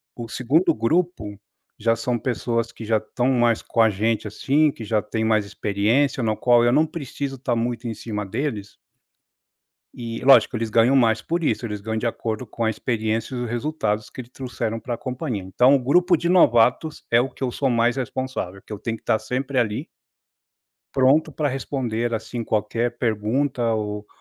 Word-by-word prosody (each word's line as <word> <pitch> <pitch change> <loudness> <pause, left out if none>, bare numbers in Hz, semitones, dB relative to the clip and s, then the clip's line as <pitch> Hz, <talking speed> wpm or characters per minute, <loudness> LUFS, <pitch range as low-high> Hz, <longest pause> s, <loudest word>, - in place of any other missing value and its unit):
O 120 -1 -6
2º 135 +10 +2
grupo, 115 - -1 0.4
já 115 +1 +2
são 120 +1 -1
pessoas 115 -2 -1
que 115 - -10
já 110 0 +2
estão 120 +4 -1
mais 120 -2 +2
com - - -5
a 110 - +6
gente, 110 +2 -1
assim, 145 +8 +2
que 115 - -10
já 110 0 0
têm 110 +1 -3
mais 110 -2 +2
experiência, 110 +7 0
no 110 -1 +1
qual 120 +1 +4
eu 120 - +4
não 155 - +4
preciso 140 -3 -5
estar 125 -2 -2
muito 120 +1 -2
em 115 - -3
cima 105 -1 -5
deles 105 -2 -4 1.2
E 115 -1 -6
lógico, 135 -2 +6
eles 115 0 -2
ganham 115 +5 +4
mais 115 -3 +3
por 170 0 -2
isso, 125 - 0
eles 105 -2 -5
ganham 110 +1 -2
de 120 - -2
acordo 115 +1 -3
com 115 +2 -4
a 110 - +2
experiência, 110 +1 -2
e - - -3
os 115 - -5
resultados 115 -5 -2
que 130 - -8
eles 120 - -18
trouxeram 120 -3 -4
para 125 - -4
a - - -5
companhia. 125 - -4
Então 125 +9 +4
o - - +4
grupo 175 +8 +3
de 170 +2 -1
novatos, 125 -2 +3
é 115 - +5
o 130 - 0
que 135 - -14
eu 125 - -1
sou 135 - 0
mais 120 +1 +2
responsável, 130 -7 -4
que - - -11
eu 105 - -5
tenho 115 +2 -3
que - - -21
estar 110 - +1
sempre 130 +4 -2
ali 110 -3 -1 1.1
pronto 140 +4 +3
para 145 +1 -1
responder, 120 -3 -2
assim, 115 +1 -4
qualquer 115 +3 -1
pergunta, 120 +2 0
ou 105 -1 -4
120 Hz, 195 wpm, -23 LUFS, 110-130 Hz, 1.2 s, a